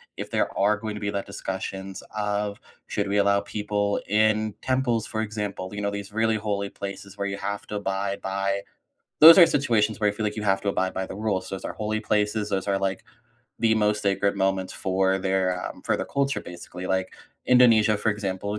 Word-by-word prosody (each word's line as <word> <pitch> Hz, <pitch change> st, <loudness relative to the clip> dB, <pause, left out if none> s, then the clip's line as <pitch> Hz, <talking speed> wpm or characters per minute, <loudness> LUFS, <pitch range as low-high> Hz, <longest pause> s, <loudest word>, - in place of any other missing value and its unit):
if -, -, -6 dB
there -, -, -1 dB
are 100 Hz, +1 st, +3 dB
going 110 Hz, 0 st, -5 dB
to 105 Hz, -, -7 dB
be 100 Hz, -, -1 dB
that 100 Hz, -1 st, -3 dB
discussions 95 Hz, -1 st, -5 dB
of 105 Hz, -1 st, -2 dB, 0.3 s
"Should 100 Hz, -1 st, -2 dB
we 100 Hz, +1 st, 0 dB
allow 100 Hz, 0 st, +4 dB
people 105 Hz, 0 st, -1 dB
in 110 Hz, 0 st, +2 dB
temples?", 130 Hz, -4 st, 0 dB
for 110 Hz, -, -3 dB
example, 105 Hz, -4 st, -4 dB
you 105 Hz, -, -4 dB
know, 100 Hz, -, 0 dB
these 100 Hz, 0 st, -6 dB
really 110 Hz, 0 st, +2 dB
holy 100 Hz, -2 st, -2 dB
places 100 Hz, 0 st, -8 dB
where 100 Hz, -, -2 dB
you 100 Hz, 0 st, -3 dB
have 100 Hz, 0 st, -4 dB
to 105 Hz, -, -5 dB
abide 100 Hz, 0 st, -2 dB
by 100 Hz, +1 st, -1 dB, 0.6 s
Those 165 Hz, +3 st, +11 dB
are 175 Hz, -, +10 dB
situations 110 Hz, -6 st, +1 dB
where 105 Hz, -1 st, +3 dB
I -, -, 0 dB
feel 110 Hz, +1 st, -3 dB
like 105 Hz, 0 st, -2 dB
you 105 Hz, -, -3 dB
have 95 Hz, -1 st, +2 dB
to 100 Hz, -, 0 dB
abide 95 Hz, -1 st, -1 dB
by 95 Hz, 0 st, -2 dB
the -, -, -7 dB
rules. 100 Hz, -3 st, -2 dB
Those 95 Hz, -, -5 dB
are -, -, -4 dB
holy 110 Hz, 0 st, -2 dB
places. 105 Hz, 0 st, 0 dB
Those 95 Hz, 0 st, -2 dB
are, 100 Hz, -, +2 dB
like, 95 Hz, -1 st, -2 dB, 0.6 s
the 110 Hz, -1 st, +3 dB
most 105 Hz, -1 st, +1 dB
sacred 100 Hz, 0 st, +1 dB
moments 95 Hz, -1 st, 0 dB
for 95 Hz, 0 st, +1 dB
their, 95 Hz, -1 st, 0 dB
um, -, -, -8 dB
for -, -, +1 dB
their -, -, -4 dB
culture 140 Hz, 0 st, 0 dB
basically. 90 Hz, +1 st, -8 dB
Like 95 Hz, 0 st, -1 dB, 0.3 s
Indonesia, 115 Hz, -4 st, +5 dB
for 110 Hz, -, -1 dB
example, 100 Hz, 0 st, -3 dB
100 Hz, 210 wpm, -25 LUFS, 95-105 Hz, 0.6 s, Those